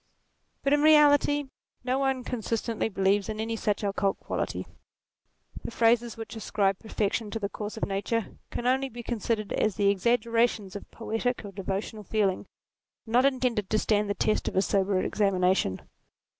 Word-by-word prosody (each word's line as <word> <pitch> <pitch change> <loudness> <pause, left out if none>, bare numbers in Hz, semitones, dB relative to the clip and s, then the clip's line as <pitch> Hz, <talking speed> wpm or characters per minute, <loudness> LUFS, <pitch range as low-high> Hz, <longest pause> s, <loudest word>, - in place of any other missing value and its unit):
But, 275 - +3
in 290 - +3
reality, 290 -1 +5 0.4
no 255 +2 0
one 265 -2 0
consistently 230 -2 -2
believes 195 +1 +1
in 215 0 -4
any 225 +1 -2
such 210 -1 -1
occult 200 -1 0
quality. - - -3 1.0
The - - -4
phrases 235 0 +2
which 225 0 -7
ascribe 200 -3 0
perfection 220 0 -2
to 225 - -3
the 200 -2 -2
course 210 +1 -6
of - - 0
nature 200 +3 -2
can 240 - -5
only 265 +2 +2
be 240 -1 -8
con 235 -1 -3
sidered 215 -1 -1
as 215 - +1
the 200 -2 +3
exaggerations 230 0 +1
of 205 - -8
poetic 230 +1 -2
or 200 - -7
devotional 195 +2 -4
feeling, 200 -2 0 0.6
not 245 +3 +3
intended 250 -7 0
to 215 - +2
stand 210 -1 +1
the 205 - 0
test 215 - 0
of - - -3
a 190 - +3
sober 195 -1 +1
examination. 185 - +1
220 Hz, 165 wpm, -28 LUFS, 200-240 Hz, 1.0 s, reality